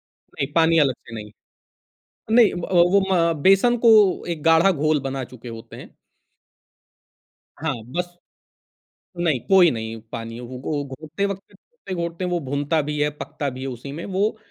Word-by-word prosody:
नहीं 135 Hz, -, -6 dB
पानी 165 Hz, 0 st, +4 dB
अलग 140 Hz, -4 st, +3 dB
से 115 Hz, -, -13 dB
नहीं। 105 Hz, -2 st, -8 dB, 1.0 s
नहीं 230 Hz, -2 st, +6 dB
अ, -, -, -7 dB, 0.2 s
वो 180 Hz, +3 st, +5 dB
म 170 Hz, -2 st, +3 dB
बेसन 195 Hz, +6 st, +5 dB
को 230 Hz, -, +8 dB, 0.4 s
एक 160 Hz, -3 st, -4 dB
गाढ़ा 165 Hz, +4 st, +5 dB
घोल 155 Hz, -2 st, +1 dB
बना 135 Hz, 0 st, -4 dB
चुके 125 Hz, -1 st, -11 dB
होते 115 Hz, -1 st, -10 dB
हैं। -, -, -11 dB, 1.7 s
हाँ, 155 Hz, -2 st, -1 dB, 0.2 s
बस 175 Hz, +1 st, -4 dB, 1.0 s
नहीं, 165 Hz, -7 st, +1 dB
कोई 190 Hz, -3 st, +6 dB
नहीं 110 Hz, -1 st, -5 dB
पानी 115 Hz, 0 st, -6 dB
वो 125 Hz, +1 st, -8 dB
गो 145 Hz, +2 st, -3 dB
घोंटते 155 Hz, +7 st, -5 dB
वक़्त, 200 Hz, -1 st, -6 dB
घोंटते-घोंटते 180 Hz, -, -6 dB
वो 175 Hz, -, 0 dB
भुनता 145 Hz, +3 st, 0 dB
भी 150 Hz, +1 st, -4 dB
है, 150 Hz, -, +2 dB
पकता 145 Hz, -1 st, -4 dB
भी 130 Hz, 0 st, -9 dB
है 135 Hz, -, -4 dB
उसी 130 Hz, +2 st, -7 dB
में 160 Hz, +4 st, -6 dB
वो 200 Hz, +3 st, -1 dB
155 Hz, 160 wpm, -22 LUFS, 135-180 Hz, 1.7 s, को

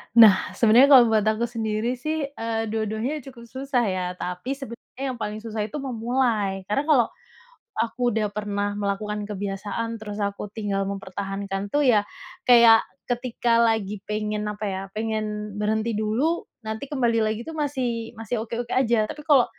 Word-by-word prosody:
Nah, 200 Hz, -5 st, +7 dB
sebenarnya 230 Hz, +5 st, +6 dB
kalau 240 Hz, -3 st, +8 dB
buat 215 Hz, -2 st, +2 dB
aku 220 Hz, +2 st, +1 dB
sendiri 225 Hz, +1 st, -1 dB
sih, 310 Hz, +4 st, -2 dB, 0.2 s
eee, 225 Hz, -1 st, -2 dB
dua-duanya 220 Hz, +6 st, -2 dB
cukup 235 Hz, -3 st, -12 dB
susah 260 Hz, -1 st, -1 dB
ya. 185 Hz, -1 st, -1 dB
Tapi 180 Hz, +9 st, -4 dB
sebenarnya 265 Hz, 0 st, -9 dB
yang 255 Hz, -, -4 dB
paling 215 Hz, -1 st, -4 dB
susah 220 Hz, -2 st, -3 dB
itu 295 Hz, +6 st, -5 dB
memulai. 230 Hz, -6 st, 0 dB
Karena 275 Hz, +7 st, +1 dB
kalau 270 Hz, -7 st, +5 dB, 0.7 s
aku 240 Hz, +1 st, 0 dB
udah 215 Hz, -1 st, 0 dB
pernah 205 Hz, -1 st, -2 dB
melakukan 210 Hz, +1 st, -2 dB
kebiasaan 205 Hz, +3 st, -3 dB
terus 210 Hz, -1 st, -6 dB
aku 200 Hz, 0 st, -3 dB
tinggal 200 Hz, -2 st, -2 dB
mempertahankan 195 Hz, 0 st, -4 dB
tuh 290 Hz, -1 st, +3 dB
ya, 215 Hz, -4 st, +5 dB, 0.4 s
kayak 235 Hz, -2 st, +8 dB, 0.2 s
ketika 240 Hz, -1 st, +1 dB
lagi 210 Hz, -3 st, 0 dB
pengen 210 Hz, 0 st, -2 dB
apa 210 Hz, +1 st, -8 dB
ya, 190 Hz, -1 st, -2 dB, 0.2 s
pengen 215 Hz, -1 st, -3 dB
berhenti 220 Hz, +2 st, 0 dB
dulu 230 Hz, +11 st, 0 dB, 0.2 s
nanti 220 Hz, +2 st, -4 dB
kembali 235 Hz, -5 st, +2 dB
lagi 215 Hz, 0 st, -1 dB
tuh 320 Hz, -, -6 dB
masih 255 Hz, -6 st, -2 dB
masih 225 Hz, +2 st, -3 dB
oke-oke 235 Hz, +1 st, -4 dB
aja, 235 Hz, -4 st, +3 dB
tapi 300 Hz, -, -7 dB
kalau 275 Hz, -5 st, +6 dB
220 Hz, 155 wpm, -24 LUFS, 210-240 Hz, 0.7 s, kalau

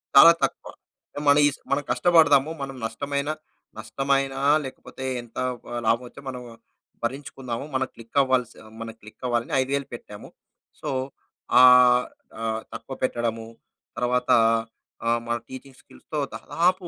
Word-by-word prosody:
చాలా 165 Hz, +5 st, +11 dB
తక్కువ. -, -, -2 dB, 0.6 s
మనీస్ 145 Hz, 0 st, +5 dB
మనం 145 Hz, +1 st, +1 dB
కష్టపడదాము. 150 Hz, 0 st, +4 dB
మనం 135 Hz, -1 st, -5 dB
నష్టమైన, 140 Hz, +5 st, -3 dB, 0.5 s
నష్టమైనా 135 Hz, 0 st, -1 dB, 0.3 s
లేకపోతే 130 Hz, 0 st, -8 dB, 0.2 s
ఎంత 120 Hz, -1 st, -16 dB, 0.3 s
ఆ, 120 Hz, -, -3 dB
హ్ -, -, -3 dB
లాభం 115 Hz, +3 st, +2 dB
వచ్చి 140 Hz, -, -13 dB
మనం 125 Hz, -1 st, -6 dB, 0.6 s
భరించుకుందాము. 130 Hz, 0 st, -4 dB
మనం 130 Hz, 0 st, +1 dB
క్లిక్ 115 Hz, +3 st, -9 dB
అవ్వాలి 130 Hz, -2 st, +2 dB
స్ -, -, -20 dB, 0.3 s
మనం 115 Hz, -1 st, -6 dB
క్లిక్ 105 Hz, +4 st, -15 dB
అవ్వాలని 120 Hz, -1 st, -1 dB
5 130 Hz, +1 st, -3 dB
వేలు 140 Hz, -1 st, -3 dB
పెట్టాము. 105 Hz, -3 st, -10 dB, 0.5 s
సో, -, -, -5 dB, 0.7 s
ఆహ్, 125 Hz, -1 st, +7 dB, 0.4 s
ఆహ్, 110 Hz, 0 st, -2 dB
తక్కువ 135 Hz, -, -7 dB
పెట్టడము, 115 Hz, -3 st, -1 dB, 0.5 s
తరవాత 125 Hz, +1 st, 0 dB, 0.8 s
ఆహ్, 120 Hz, 0 st, +2 dB
మన 120 Hz, 0 st, 0 dB
టీచింగ్ 130 Hz, 0 st, -11 dB
స్కిల్స్‌తో 155 Hz, -, -7 dB, 0.2 s
దాదాపు 180 Hz, +1 st, 0 dB
130 Hz, 130 wpm, -25 LUFS, 120-140 Hz, 0.8 s, చాలా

